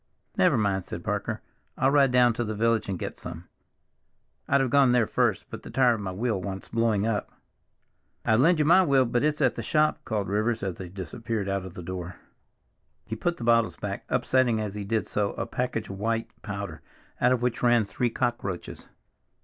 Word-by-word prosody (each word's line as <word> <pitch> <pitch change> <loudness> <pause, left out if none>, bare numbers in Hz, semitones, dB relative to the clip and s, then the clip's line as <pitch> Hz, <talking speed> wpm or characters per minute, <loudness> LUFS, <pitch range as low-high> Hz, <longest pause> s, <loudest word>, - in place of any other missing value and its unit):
"Never - - +4
mind," 100 -3 +1
said - - -7
Parker. - - -2 0.4
"I'll 135 - +3
ride 140 -2 +4
down 125 -1 +5
to 120 - -2
the 110 -1 -3
village 115 -1 +1
and 95 - -2
get - - -6
some. 85 +1 -8 1.0
I'd 140 - +3
have 130 -3 0
gone 135 -2 +5
there 120 -2 +4
first, - - 0
but - - -7
the - - -10
tire 125 +1 +4
of 110 - -4
my 95 -2 -3
wheel 105 0 -1
wants 95 +1 -6
blowing 115 -3 +1
up." 110 -2 -1 0.9
"I'd 110 0 +3
lend 165 +6 +5
you 150 - +2
my 180 +5 +7
wheel, 135 -6 +4
but 120 +1 0
it's 150 0 +1
at 130 - +3
the - - -5
shop," 150 +7 +2
called 105 -3 -2
Rivers 110 +3 0
as 95 -3 -3
they 90 -2 -7
disappeared 100 +3 -4
out 100 -1 -2
of 95 - -10
the 90 - -7
door. 90 0 -6 0.9
He 110 - -4
put 175 +9 -1
the - - -7
bottles 115 -1 +3
back, - - -5
upsetting, 125 -4 +2
as 105 -2 -3
he 105 -1 -5
did 105 -1 -1
so, 100 -1 -1
a - - -3
package 125 -3 -2
of 95 - -7
some - - -11
white 115 +1 -1
powder, 100 -7 -6 0.4
out 125 - +4
of 125 -1 +1
which 125 -2 -1
ran 120 -2 +4
three 120 +4 -1
cockroaches. 115 -7 -3
115 Hz, 210 wpm, -27 LUFS, 100-125 Hz, 1.0 s, my